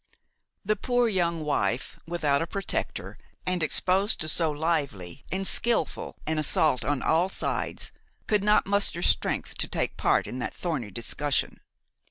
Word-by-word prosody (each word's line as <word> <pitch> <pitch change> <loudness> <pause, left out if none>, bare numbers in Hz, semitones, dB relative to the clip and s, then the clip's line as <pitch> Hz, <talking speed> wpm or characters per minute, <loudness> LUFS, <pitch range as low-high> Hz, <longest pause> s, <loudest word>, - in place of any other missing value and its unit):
The 215 +2 +2
poor 245 +3 +1
young 170 -6 0
wife, 120 -4 -1
without 150 -5 +1
a 165 - -1
protector 195 +3 -4 0.3
and 180 -1 0
exposed 185 +6 +3
to 155 - -2
so 165 0 +2
lively 145 - -2
and 195 +1 -1
skilful 230 -5 +1
an 155 0 0
assault 150 -2 +2
on 145 -3 -1
all 170 +4 +2
sides, - - -3 0.3
could 210 -2 +1
not 210 +1 +4
muster 200 -3 +1
strength - - +1
to - - +2
take - - -2
part - - +2
in 125 - -6
that - - -4
thorny 150 - -3
discussion. 130 +7 -2
165 Hz, 150 wpm, -27 LUFS, 145-190 Hz, 0.3 s, not